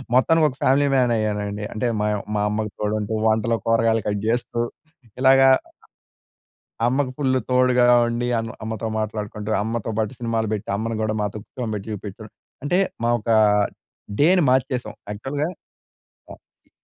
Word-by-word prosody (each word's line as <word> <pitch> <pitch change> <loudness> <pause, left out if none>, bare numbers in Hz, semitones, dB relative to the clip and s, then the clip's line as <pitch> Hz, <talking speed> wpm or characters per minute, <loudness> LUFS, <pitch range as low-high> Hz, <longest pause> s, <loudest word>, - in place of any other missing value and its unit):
మొత్తానికి 160 +5 +4
ఒక 130 - -10
family 140 +2 +4
man 125 -2 +3
అయ్యానండి. 105 -1 -2
అంటే 110 +3 -1
మా 105 - +1 0.3
మా 105 - +1
అమ్మకి 105 0 -2
తోడంటూ, 105 0 -1
వంటలో 110 +1 +2
కూరగాయలు 115 -1 +2
కట్ 105 -1 -1
చేస్తూ 120 0 -1 0.6
ఇలాగా 135 0 +6 1.4
అమ్మకి 130 +1 0
ఫుల్ 130 -3 +1
తోడుగా 125 -1 +4 0.2
ఉండి 120 +1 -2
అమ్ 115 0 -4
అమ్మతో 110 0 -3
మాట్లాడుకుంటూ, 105 0 -4
అమ్మతో 115 0 -3
బాటు 110 +2 -1
సినిమాలు 115 -2 -1
బెట్టి 105 - -4
అమ్మను 115 +1 -3
కూడా 110 0 -1
మాతో 105 +1 -3
కూర్చోబెట్టి 110 -4 -5
చూపించడం. 105 +1 -8 0.3
అంటే 175 +6 +2 0.3
మా - - +2
ఒకా 110 +1 +2 0.8
డే‌ని 175 +3 +5
మార్చేసాం. 130 -1 0 0.2
యాక్చువల్‌గా 135 +8 -3 0.8
అ - - -7 0.3
ఇ - - -33
115 Hz, 140 wpm, -22 LUFS, 105-130 Hz, 1.4 s, ఇలాగా